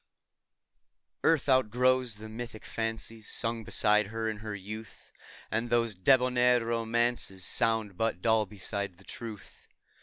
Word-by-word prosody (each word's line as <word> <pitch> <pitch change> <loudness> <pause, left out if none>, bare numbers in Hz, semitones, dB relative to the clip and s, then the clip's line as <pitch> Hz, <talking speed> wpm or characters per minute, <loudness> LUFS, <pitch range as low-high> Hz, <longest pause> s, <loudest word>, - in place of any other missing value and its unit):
ARTH 160 -3 +3
outgrows 130 -1 +3
the 110 +1 -9
mythic 110 0 -7
fancies 115 -1 -4
Sung 115 -1 -1
beside 105 -1 +2
her 115 +1 -3
in 110 -1 -2
her 105 0 -5
youth; 110 +3 -9 0.4
And 115 +1 0
those 115 -2 +2
debonair 125 +3 +4
romances 115 -4 0
Sound 110 -4 +1
but 115 -6 0
dull 110 +1 +2
beside 100 -1 -4
the 95 - -18
truth. 110 -1 -10
115 Hz, 125 wpm, -30 LUFS, 105-120 Hz, 0.4 s, debonair